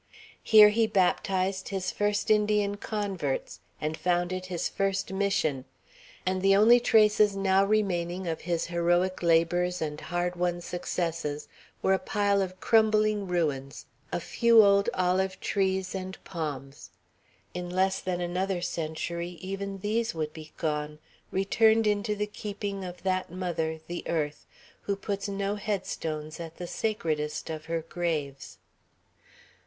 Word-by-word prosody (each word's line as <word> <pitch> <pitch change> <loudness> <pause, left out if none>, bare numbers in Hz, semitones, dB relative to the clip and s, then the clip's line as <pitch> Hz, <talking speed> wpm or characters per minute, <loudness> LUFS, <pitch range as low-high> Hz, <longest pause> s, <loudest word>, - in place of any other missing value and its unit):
Here 215 -2 +8
he 225 +1 +2
baptized 190 -1 +1
his 190 -2 -2
first 205 +1 0
Indian 210 -1 +2
converts, 190 - -3 0.2
and 155 +1 -2
founded 175 +2 -1
his 175 -2 -2
first 195 -1 -1
Mission. 190 -9 0 0.6
And 185 0 0
the 195 +1 +5
only 225 +4 +7
traces 210 -3 +4
now 195 0 +3
remaining 190 -3 0
of 165 -2 -3
his 170 0 -1
heroic 175 +2 +1
labors 175 +1 +2
and 150 -1 -4
hard 175 0 -2
won 175 0 0
successes 165 -4 -3 0.4
were 190 - +4
a 190 - +2
pile 200 -1 +1
of 185 -1 -4
crumbling 215 -2 +3
ruins, 145 -6 -2 0.3
a - - -1
few 230 -2 +5
old 200 0 +4
olive 185 +1 +1
trees 190 -2 0
and 190 0 -5
palms; 145 -5 -6 0.6
in 180 0 -5
less 190 +1 +1
than 180 -1 -3
another 180 +2 -1
century 170 +2 -4
even 195 +1 -5
these 225 +1 -1
would 155 -1 -3
be 155 -1 -10
gone; 150 -1 -2 0.3
returned 220 +3 +3
into 210 0 +1
the 210 0 -1
keeping 205 -1 -5
of 180 -1 -8
that 185 -2 -1
mother, 170 -3 -2
the 175 0 -5
earth, 150 -3 -2 0.4
who 200 - 0
puts 200 0 -4
no 200 +1 -2
head 205 -2 -2
stones 155 0 -5
at 165 -1 -8
the 175 - -5
sacredest 160 -7 -2
of 155 -1 -6
her 165 0 -2
graves. 155 -5 -3
185 Hz, 140 wpm, -28 LUFS, 170-200 Hz, 0.6 s, Here